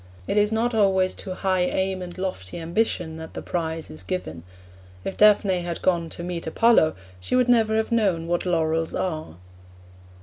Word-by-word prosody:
It - - -2
is 210 0 +3
not 230 +2 0
always 190 -3 +3
to 185 -2 -5
high 185 -1 0
aim 190 +1 0
and 175 0 -8
lofty 185 - -4
ambition 170 -1 -1
that 160 0 -9
the - - -4
prize 165 -2 -3
is 80 +2 -9
given. 90 -3 -4 0.6
If - - -3
Daphne 205 -3 +5
had 175 -1 -5
gone 170 -3 +1
to 170 - -6
meet 175 -2 -4
Apollo, 160 -3 +4 0.2
she 90 - -2
would 250 -1 +3
never 225 -3 +3
have 220 +2 -1
known 195 -8 +1
what 175 +1 -1
laurels 165 -2 0
are. 155 - -3
180 Hz, 175 wpm, -24 LUFS, 165-205 Hz, 0.6 s, Daphne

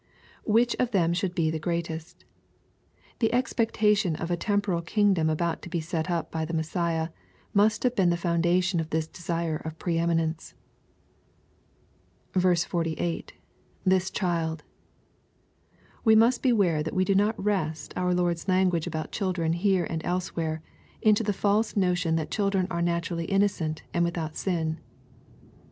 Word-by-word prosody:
[Which 235 +2 +3
of 250 - +2
ihem 170 -6 +2
should 180 0 -2
he 160 -2 +2
{he 160 - -3
greatest,] 170 0 -4 0.9
The 225 - +2
expectation 215 -6 +2
of 165 +2 -4
a - - +3
temporal 200 -1 0
kingdom 185 -3 +2
about 165 +2 -1
to - - -9
be 175 - -1
set 160 +1 -3
up 170 -2 -2
by 160 -1 -2
the 165 +1 -3
Messiah, 160 0 -1 0.4
must 210 +2 +3
have 250 -1 +1
been 185 -3 +3
the 170 - +1
foundation 175 +1 +1
of 160 -1 -3
this 160 0 0
desire 170 -1 -3
of 160 +1 -7
pre 165 -1 -1
eminence. 165 -1 -1 1.8
48. 175 -2 0 0.3
— - - -35
[Ihis 190 0 +3
child.] 165 -4 -1 1.4
We 220 -2 +6
must 230 +3 +4
beware 200 - +3
that 155 - -4
we 185 0 +2
do 195 - +2
not 205 +3 +2
wrest 175 -7 -2
onj 180 0 0
Lord's 175 0 0
language 185 -3 +2
about 160 -2 -4
children 180 -5 -1
here 185 0 +2
and 160 -1 -4
elsewhere, 170 -3 -2 0.4
into 215 0 +5
the 210 -2 0
false 205 +3 +1
notion 180 -3 +2
that 160 -2 -2
ctSdren 195 -3 +1
are 170 0 -1
naturally 170 0 -1
innocent, 195 -5 0
and 170 - +2
without 170 -2 -2
sin. 160 -4 -1
175 Hz, 150 wpm, -27 LUFS, 165-195 Hz, 1.8 s, We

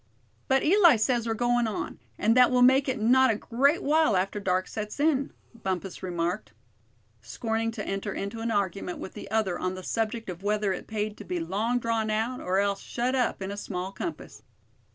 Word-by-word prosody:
"But 265 0 +3
Eli 345 -3 +6
says 235 +1 +1
we're 225 - 0
going 240 0 +2
on, 215 - -4 0.2
and 225 +2 +3
that 250 -1 +7
we'll 250 -1 +4
make 265 +2 +5
it 255 - -1
not 255 +4 +5
a 225 - +2
great 275 +9 +1
while 305 -8 +3
after 195 +3 -1
dark 185 -1 0
sets 210 +4 -6
in," 285 -2 +2 0.3
Bumpus 190 -1 -3
remarked, 175 - -3 0.7
scorning 225 - -2
to 215 -3 -5
enter 195 +1 -3
into 200 +4 -4
an 230 +1 -2
argument 195 -4 -1
with - - -8
the - - -9
other 210 -4 0
on 185 0 -2
the 185 - -8
subject 225 +2 -2
of 180 -1 -6
whether 205 -1 0
it - - -7
paid 215 -1 -3
to - - -9
be 180 -2 -3
long 205 +9 -1
drawn 230 -2 -1
out, 225 +4 -1
or 185 +1 0
else 200 0 +1
shut 245 +2 -2
up 250 -6 0
in 190 - -4
a - - -4
small 185 -2 -4
compass. 330 - -7
220 Hz, 200 wpm, -27 LUFS, 195-245 Hz, 0.7 s, that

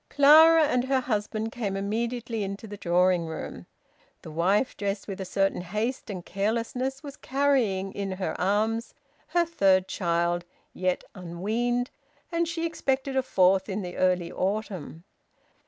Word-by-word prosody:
Clara 315 +3 +7
and 250 -4 +1
her 265 0 +1
husband 220 -1 -2
came 200 -5 -3
immediately 230 +3 -2
into 200 +2 -4
the 205 -1 -7
drawing 180 -2 +2
room. 160 - -7 0.6
The 160 - -8
wife, 190 +10 +1
dressed 200 0 -3
with 195 -1 -5
a - - -3
certain 195 0 0
haste 215 +9 -3
and 185 -4 -6
carelessness, 235 - -2
was 280 -2 -8
carrying 255 -9 +1
in 195 -1 -3
her 185 0 -3
arms 215 +5 0 0.3
her 345 -1 +2
third 195 - +3
child, 170 -1 0 0.3
yet 185 0 -1
unweaned, 220 +8 -2 0.4
and 335 0 +1
she 335 0 -2
expected 270 -4 -1
a 265 - +3
fourth 190 -5 +3
in 200 +1 -2
the 180 -1 -6
early 180 -2 +1
autumn. 190 -5 -3
205 Hz, 145 wpm, -27 LUFS, 185-250 Hz, 0.6 s, Clara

